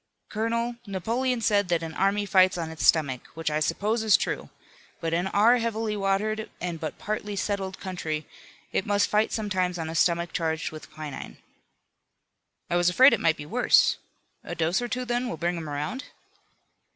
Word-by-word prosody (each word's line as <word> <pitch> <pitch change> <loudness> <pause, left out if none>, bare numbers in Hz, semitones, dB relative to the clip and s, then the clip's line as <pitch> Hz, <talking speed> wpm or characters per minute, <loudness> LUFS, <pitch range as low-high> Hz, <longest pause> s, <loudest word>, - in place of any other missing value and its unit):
Colonel, 230 +2 -1
Napoleon 230 +6 -1
said 205 -3 +2
that 170 -1 +1
an 160 -1 -5
army 200 +3 +1
fights 185 -2 +4
on 165 -2 -3
its 160 - -5
stomach, 140 -6 +3
which 165 -1 -2
I 150 - +1
suppose 210 +8 0
is 215 -3 +5
true, - - -3 0.5
but 165 0 -2
in 175 +3 +1
our 220 +5 +5
heavily 225 -2 -1
watered 210 +2 -1
and 175 -2 -4
but 155 -2 -5
partly 210 -1 -4
settled 195 -1 -2
country, 160 -5 -4 0.5
it - - 0
must 205 0 +2
fight 210 +1 +2
sometimes 185 -4 -1
on 160 -1 -4
a - - -5
stomach 170 +1 +1
charged 160 -1 -1
with 155 -1 -10
quinine." 150 -3 -7 1.3
"I 175 - +1
was 175 0 +4
afraid 260 +10 +7
it - - +2
might 160 -1 +3
be 145 - -7
worse. 245 +11 +4 0.5
A 175 - -6
dose 165 +5 +1
or 245 - -2
two 250 +1 -3
then 245 +1 -1
will 165 - -4
bring 175 +3 -1
him 160 -3 -5
around?" 150 - -4
190 Hz, 180 wpm, -26 LUFS, 165-215 Hz, 1.3 s, afraid